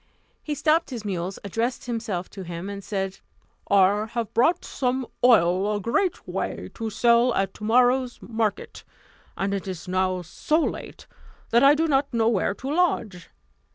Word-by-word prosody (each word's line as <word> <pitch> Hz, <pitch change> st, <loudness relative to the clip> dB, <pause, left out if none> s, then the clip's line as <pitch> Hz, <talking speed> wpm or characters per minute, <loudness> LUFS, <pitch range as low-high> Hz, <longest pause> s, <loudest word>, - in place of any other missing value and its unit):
He 300 Hz, -, -4 dB
stopped 320 Hz, +3 st, +2 dB
his 235 Hz, -5 st, -6 dB
mules, 185 Hz, -1 st, -3 dB
addressed 230 Hz, +5 st, -2 dB
himself 225 Hz, -7 st, -3 dB
to 195 Hz, -, -8 dB
him, 175 Hz, +2 st, -6 dB
and 200 Hz, 0 st, -7 dB
said, 195 Hz, -2 st, -3 dB, 0.5 s
"I 200 Hz, +2 st, +4 dB
have 235 Hz, -3 st, -3 dB
brought 325 Hz, +10 st, +2 dB
some 255 Hz, 0 st, -1 dB, 0.2 s
oil 200 Hz, -3 st, +4 dB
a -, -, -1 dB
great 355 Hz, -, -1 dB
way, -, -, -4 dB
to 225 Hz, -1 st, -4 dB
sell 235 Hz, +2 st, +3 dB
at 195 Hz, 0 st, 0 dB
tomorrow's 245 Hz, +3 st, +2 dB
market; 220 Hz, -2 st, -3 dB, 0.5 s
and 195 Hz, +1 st, -1 dB
it 195 Hz, -1 st, -3 dB
is 185 Hz, -1 st, -6 dB
now 185 Hz, 0 st, 0 dB
so 300 Hz, -, 0 dB
late -, -, -4 dB, 0.5 s
that 235 Hz, -, +5 dB
I 280 Hz, +2 st, +7 dB
do 320 Hz, +2 st, +1 dB
not 275 Hz, -1 st, +1 dB
know 230 Hz, -2 st, +2 dB
where 200 Hz, -3 st, 0 dB
to 270 Hz, +6 st, -4 dB
lodge. 230 Hz, -, 0 dB
220 Hz, 160 wpm, -25 LUFS, 195-250 Hz, 0.5 s, I